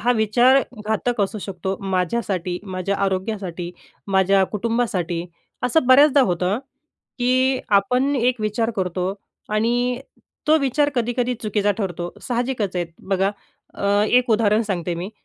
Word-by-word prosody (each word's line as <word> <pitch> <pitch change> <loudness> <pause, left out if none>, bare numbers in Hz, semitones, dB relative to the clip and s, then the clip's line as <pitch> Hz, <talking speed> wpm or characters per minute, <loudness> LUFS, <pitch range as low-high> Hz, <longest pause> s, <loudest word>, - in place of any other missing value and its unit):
हा 245 +1 +3
विचार 240 +5 +4 0.3
घातक 220 +1 0
असू 200 +2 -1
शकतो 190 0 -4
माझ्यासाठी, 185 -1 -1
माझ्या 190 0 -3
आरोग्यासाठी, 190 -3 -3 0.4
माझ्या 195 0 +3
कुटुंबासाठी. 210 -6 -1 0.4
असं 250 +2 +2
बऱ्याचदा 280 +2 +6
होतं, 185 -1 +1 0.6
की 255 +1 +2
आपण 250 +8 +2
एक 245 -1 +1
विचार 220 +2 0
करतो 185 0 -1 0.3
आणि 240 +3 +1 0.5
तो 310 +1 +6
विचार 285 +1 +1
कधी-कधी 245 +1 0
चुकीचा 205 -1 +1
ठरतो, 175 -3 -3 0.2
साहजिकच 240 -6 -1
आहे. 175 - 0 0.2
बघा, 195 0 +2 0.4
अ, - - -5 0.2
एक 250 -1 +3
उदाहरण 215 0 +3
सांगते 175 -1 -2
मी, 180 +5 -5
215 Hz, 125 wpm, -22 LUFS, 190-245 Hz, 0.6 s, बऱ्याचदा